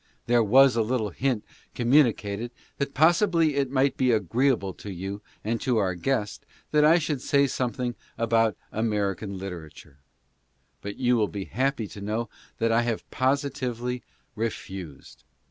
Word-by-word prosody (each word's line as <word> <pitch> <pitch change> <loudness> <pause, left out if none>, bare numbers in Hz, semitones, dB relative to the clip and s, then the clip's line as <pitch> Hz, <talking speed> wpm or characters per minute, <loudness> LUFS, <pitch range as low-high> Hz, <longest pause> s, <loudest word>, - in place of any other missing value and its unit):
There 120 0 +4
was 130 +4 +6
a 115 - +3
little 110 -2 -1
hint 125 -5 -1 0.3
communicated 120 -4 +2 0.3
that 140 -1 -2
possibly 165 0 +4
it 140 -2 +1
might 135 0 +1
be 130 -1 +3
agreeable 110 0 +1
to 100 - -8
you 95 +3 -5 0.2
and 115 +2 -1
to 125 -4 +1
our 95 -4 +1
guest 105 +3 -2 0.3
that 150 -1 +4
I 160 +3 +6
should 150 -5 -2
say 140 +1 +3
something 125 -1 -2 0.2
about 115 -1 +2
American 105 -2 -1
litera 90 -5 -6
ture, 75 -1 -16 0.8
but 100 0 -6
you 125 -1 +2
will 105 -2 +2
be 95 +2 -5
happy 130 -3 -1
to 100 - -10
know 110 +3 -2 0.3
that 115 0 +1
I 115 +1 +4
have 120 -2 -2
positively 130 -2 -1 0.3
refused. 95 - -6
120 Hz, 150 wpm, -26 LUFS, 105-135 Hz, 0.8 s, was